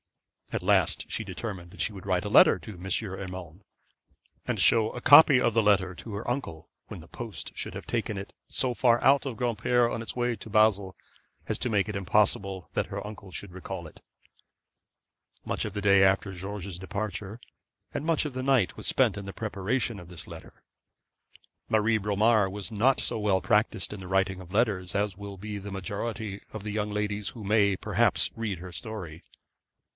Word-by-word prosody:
At - - -3
last - - +2
she 115 - -2
determined 95 -3 -6
that 90 - -15
she 105 +5 -1
would 95 -2 -10
write 95 +1 +1
a - - -2
letter - - +7
to 110 - -9
M. 90 0 -11
Urmand, 95 -3 -4 0.8
and - - -2
show 110 -1 +5
a - - -6
copy 145 0 +8
of 120 -2 +2
the 115 - +4
letter 95 -3 +3
to 110 +4 -9
her 105 +4 -4
uncle 120 - -4 0.2
when - - -8
the - - -14
post - - -7
should - - -4
have - - -7
taken 110 -3 -2
it 95 - -7 0.2
so 130 -2 +2
far 120 -1 +3
out 140 +3 +5
of 120 -4 -5
Granpere 120 +1 +2
on 115 - -3
its 115 - -5
way 120 -1 0
to 110 - -11
Basle, 100 -3 +3 0.5
as - - 0
to 125 - 0
make 105 -2 +1
it 105 - -4
impossible 95 -1 +1
that - - 0
her - - -5
uncle 105 -2 -9
should 90 +3 -5
recall 90 -1 -7
it. - - -16 1.4
Much - - -2
of - - -5
the 105 - -3
day 100 -1 +5
after 95 +1 +2
George's 95 -1 -6
departure, 100 +2 -5 0.5
and - - -3
much 160 -1 +1
of 145 - -4
the 130 0 -3
night, 130 -8 +2
was - - -2
spent 115 -7 +2
in 100 - -6
the 95 - -6
preparation 110 +2 -2
of 90 -1 -12
this 90 -3 -9
letter. - - -12 1.1
Marie 110 +1 +3
Bromar 105 0 +3
was 100 +3 -6
not 120 +5 +3
so - - 0
well 100 -3 +2
practised 105 +1 +1
in 105 - -7
the 95 - -8
writing 95 0 0
of 90 -1 -12
letters 100 -4 0
as 100 -1 0
will 100 0 -8
be 105 +1 -6
the 100 +1 -8
majority 100 +2 -4
of 110 -2 -7
the 105 - -4
young 105 -1 -1
ladies 105 0 -2
who 115 - -10
may, 100 -1 +3
perhaps, - - +2
read 110 -4 -3
her 90 +2 -9
history. 90 -4 -7
105 Hz, 195 wpm, -28 LUFS, 95-115 Hz, 1.4 s, copy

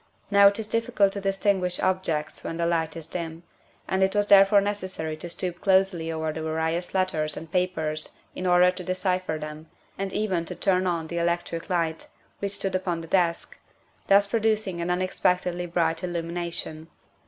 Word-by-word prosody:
Now 200 0 +8
it 200 - +3
is 220 -2 -4
difficult 230 -3 +1
to 200 - -4
distinguish 195 -2 0
objects 180 -5 -1
when 165 - -4
the 170 - 0
light 165 -1 0
is 165 - -7
dim, 165 0 -6 0.4
and 190 - 0
it 190 +1 +2
was 205 0 +3
therefore 200 0 +7
necessary 185 -6 -3
to 170 +2 -6
stoop 175 0 -3
closely 190 -4 +2
over 160 -1 -2
the 160 - -5
various 160 +3 -2
let 185 0 +2
ters 155 -4 -2
and 160 0 -8
papers 160 -4 -1 0.3
hi - - -5
order 180 0 +5
to 180 0 -7
decipher 185 -2 -1
them, 155 +1 -8 0.3
and 195 -1 -2
even 190 -6 0
to - - -5
turn 185 -1 +2
on 170 -2 -1
the 170 +1 -3
electric 170 0 -2
light, 165 -3 -1 0.3
which 200 0 -2
stood 195 -1 -2
upon 180 -3 -1
the 165 - -9
desk, 170 -2 0 0.5
thus 200 +1 +6
producing 215 -4 0
an 170 - -2
unexpectedly 180 -1 0
bright 165 0 0
illumination. 170 -2 -4
180 Hz, 175 wpm, -26 LUFS, 165-190 Hz, 0.5 s, Now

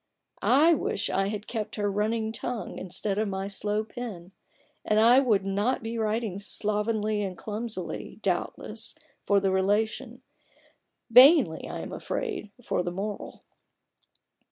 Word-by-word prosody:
I 305 +6 +5
wish 310 - -1
I 195 0 +1
had 210 0 -4 0.3
her 205 -1 0
running 220 +2 0
tongue 230 0 -5
instead 195 +2 -2
of 215 - 0
my 190 0 -3
slow 205 +2 -1
pen, 210 -6 -8 0.5
and 215 - +1
then 220 - +5
I 245 +3 +7
would 215 -8 +2
not 205 +6 0
be 225 +1 -4
writing 215 -2 -1
slovenly 210 +1 0
and 190 -3 -4
clumsily, 215 -4 -5
doubtless, - - -3 0.3
for 200 -1 +4
the 195 -1 +1
relation; 220 +6 0 0.9
vainly, 250 - +7
I - - -5
am - - -7
afraid, 430 - -4
for 180 - 0
the 175 - -2
moral. 200 +3 -6
210 Hz, 135 wpm, -27 LUFS, 195-230 Hz, 0.9 s, I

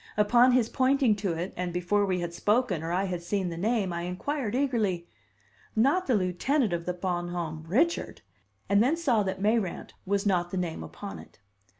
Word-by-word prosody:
Upon 240 +4 +5
his 245 -3 +3
pointing 260 -2 +2
to 195 -4 -1
it, 170 +3 -4
and 180 -1 -3
before 180 +4 +1
we 185 -2 0
had 170 0 -4
spoken 210 -1 +1
or 165 +1 -4
I 185 +2 +1
had 180 -3 -3
seen 185 +1 -1
the 170 - -5
name, 200 0 0
I 170 - -3
inquired 215 - -3
eagerly: 220 -11 0 0.7
"Not 275 +12 +2
the 255 - +3
lieutenant 205 - +1
of 170 0 -3
the 180 - 0
Bon 175 -1 -2
Homme 165 -3 -4
Richard?" 315 - 0 0.4
and 200 +1 +4
then 275 +8 +2
saw 260 -10 +2
that 190 -1 -2
Mayrant 215 -4 0
was 200 +1 0
not 180 -3 +1
the 190 - -4
name 175 -3 -3
upon 200 -1 -8
it. - - -15
195 Hz, 195 wpm, -28 LUFS, 175-240 Hz, 0.7 s, Upon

